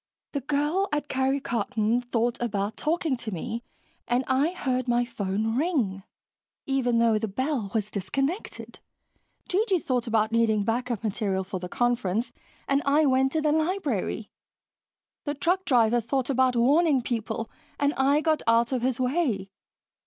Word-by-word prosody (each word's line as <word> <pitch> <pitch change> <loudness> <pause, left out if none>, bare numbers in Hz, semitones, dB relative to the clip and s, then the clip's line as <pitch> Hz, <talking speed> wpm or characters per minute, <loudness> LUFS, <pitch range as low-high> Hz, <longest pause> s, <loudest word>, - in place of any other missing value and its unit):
"The 280 - -2
girl 300 +8 0
at 295 0 -1
Karry 265 +1 +1
Karton 230 -1 0
thought 240 0 -1
about 210 -2 -1
talking 315 0 0
to 225 -2 -6
me, 230 +6 -4 0.5
and 245 +2 +1
I 270 +4 +2
heard 260 -8 -2
my 240 0 +2
phone 220 -1 -2
ring, 255 - 0 0.6
even 255 -3 +1
though 230 -2 +3
the 220 - -2
bell 255 0 -2
was 210 -1 -1
disconnected. 275 - -3 0.7
G.G. 390 +1 +2
thought 255 -8 -1
about 220 -1 +2
needing 225 -2 +2
backup 235 0 -1
material 200 -3 -1
for 185 0 -5
the 180 0 -6
conference 235 -1 0 0.4
and 275 0 +2
I 295 +2 +3
went 265 0 +3
to 315 - +1
the 300 -1 +2
library. 310 - -1 0.9
The 290 -1 -2
truck 360 +6 0
driver 240 -2 +3
thought 260 +3 -1
about 260 -1 +3
warning 275 +3 +3
people 225 -1 -3 0.3
and 285 0 +2
I 280 +2 +3
got 310 -1 +1
out 230 +1 +4
of 255 -2 0
his 255 0 0
way. 250 - 0
245 Hz, 155 wpm, -26 LUFS, 225-285 Hz, 0.9 s, out